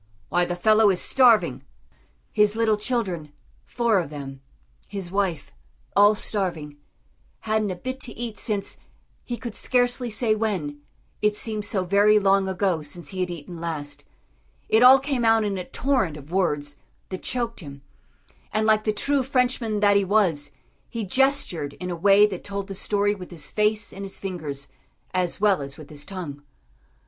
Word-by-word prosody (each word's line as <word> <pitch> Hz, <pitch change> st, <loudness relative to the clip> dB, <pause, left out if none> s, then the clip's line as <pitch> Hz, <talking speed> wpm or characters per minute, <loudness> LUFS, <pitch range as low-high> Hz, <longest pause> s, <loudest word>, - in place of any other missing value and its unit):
Why, 175 Hz, 0 st, +2 dB
the 175 Hz, -, -3 dB
fellow 215 Hz, +3 st, +4 dB
is 185 Hz, -2 st, +2 dB
starving." 220 Hz, -, +4 dB, 0.7 s
His 210 Hz, 0 st, +3 dB
little 225 Hz, -1 st, +2 dB
children 195 Hz, -, -2 dB, 0.3 s
four 235 Hz, -4 st, +2 dB
of 170 Hz, -, -4 dB
them 135 Hz, -2 st, -8 dB, 0.5 s
his 195 Hz, -3 st, -6 dB
wife 195 Hz, -5 st, -1 dB, 0.4 s
all 205 Hz, +1 st, +6 dB
starving 170 Hz, -9 st, -3 dB, 0.6 s
hadn't 215 Hz, -1 st, 0 dB
a 185 Hz, -, -3 dB
bit 255 Hz, +8 st, -5 dB
to 240 Hz, -3 st, -4 dB
eat 235 Hz, -2 st, -5 dB
since, 205 Hz, -3 st, -1 dB, 0.5 s
he 240 Hz, -, -5 dB
could 235 Hz, -3 st, -6 dB
scarcely 245 Hz, 0 st, +1 dB
say 220 Hz, 0 st, +1 dB
when, 190 Hz, -10 st, -2 dB, 0.4 s
it 210 Hz, 0 st, +2 dB
seemed 215 Hz, -1 st, -1 dB
so 190 Hz, -2 st, 0 dB
very 205 Hz, +3 st, +5 dB
long 195 Hz, -1 st, +3 dB
ago 185 Hz, -3 st, 0 dB
since 150 Hz, +3 st, -7 dB
he 190 Hz, -, -6 dB
had 180 Hz, -1 st, 0 dB
eaten 170 Hz, 0 st, -8 dB
last 145 Hz, -3 st, -5 dB, 0.7 s
it 220 Hz, -, +4 dB
all 255 Hz, +2 st, +9 dB
came 270 Hz, -2 st, -2 dB
out 225 Hz, -1 st, +4 dB
in 205 Hz, -2 st, -1 dB
a 180 Hz, -, -5 dB
torrent 250 Hz, -, 0 dB
of 145 Hz, +2 st, -13 dB
words 145 Hz, -6 st, 0 dB, 0.3 s
that 185 Hz, -, -6 dB
choked 235 Hz, -2 st, -3 dB
him, 140 Hz, -5 st, -10 dB, 0.7 s
and 215 Hz, +1 st, 0 dB
like 215 Hz, -1 st, +3 dB
the 215 Hz, -, +2 dB
true 280 Hz, +7 st, +1 dB
Frenchman 250 Hz, -5 st, 0 dB
that 205 Hz, -1 st, +5 dB
he 200 Hz, -, +2 dB
was, 185 Hz, -8 st, +2 dB, 0.4 s
he 230 Hz, -3 st, -4 dB
gestured 195 Hz, -, +1 dB
in 180 Hz, 0 st, -6 dB
a -, -, -2 dB
way 200 Hz, +4 st, +6 dB
that 195 Hz, -4 st, -4 dB
told 200 Hz, -1 st, -4 dB
the 195 Hz, -, -7 dB
story 205 Hz, +1 st, 0 dB
with 185 Hz, -3 st, -9 dB
his 155 Hz, -6 st, -4 dB
face 210 Hz, 0 st, +1 dB
and 195 Hz, -, -7 dB
his 195 Hz, -, -3 dB
fingers, 155 Hz, -8 st, -5 dB, 0.5 s
as 180 Hz, -2 st, -1 dB
well 200 Hz, -6 st, +3 dB
as 140 Hz, 0 st, -7 dB
with 155 Hz, -1 st, -12 dB
his 145 Hz, -1 st, -7 dB
tongue. 165 Hz, -7 st, -7 dB
200 Hz, 175 wpm, -24 LUFS, 170-220 Hz, 0.7 s, all